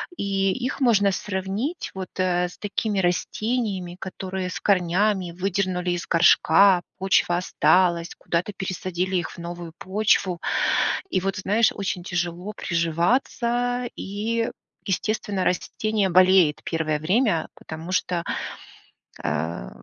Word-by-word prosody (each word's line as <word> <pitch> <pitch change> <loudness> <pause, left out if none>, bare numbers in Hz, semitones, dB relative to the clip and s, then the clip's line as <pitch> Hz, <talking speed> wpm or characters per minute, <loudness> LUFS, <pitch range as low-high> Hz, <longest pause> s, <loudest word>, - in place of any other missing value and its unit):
И 195 - 0
их 255 +2 -3
можно 205 -6 +4
сравнить 200 - -3
вот, 190 -1 -5
э, 180 -1 +2
с 175 - -13
такими 205 0 -1
растениями, 190 0 -1
которые 190 0 -4
с - - -4
корнями 185 0 +2
выдернули 185 0 -1
из 175 -1 -2
горшка, 175 +2 +5 0.2
почва 190 -2 +2
осталась, 175 -1 +2
куда-то 175 +4 -2
пересадили 185 -1 -3
их 175 - -3
в - - -12
новую 170 -1 -7
почву. 190 -3 +1 0.7
И 185 - 0
вот, 195 0 -2
знаешь, 210 +4 +2
очень 190 -3 -3
тяжело 175 +2 -3
приживаться 235 - 0
и, 225 +4 -2 0.3
естественно, 200 0 -1
растение 205 +2 0
болеет 185 -3 +5
первое 155 -2 -1
время, 185 0 +1
потому 160 +3 -8
что, 175 -2 0 1.0
э, 75 -3 -2
185 Hz, 115 wpm, -24 LUFS, 175-205 Hz, 1.0 s, горшка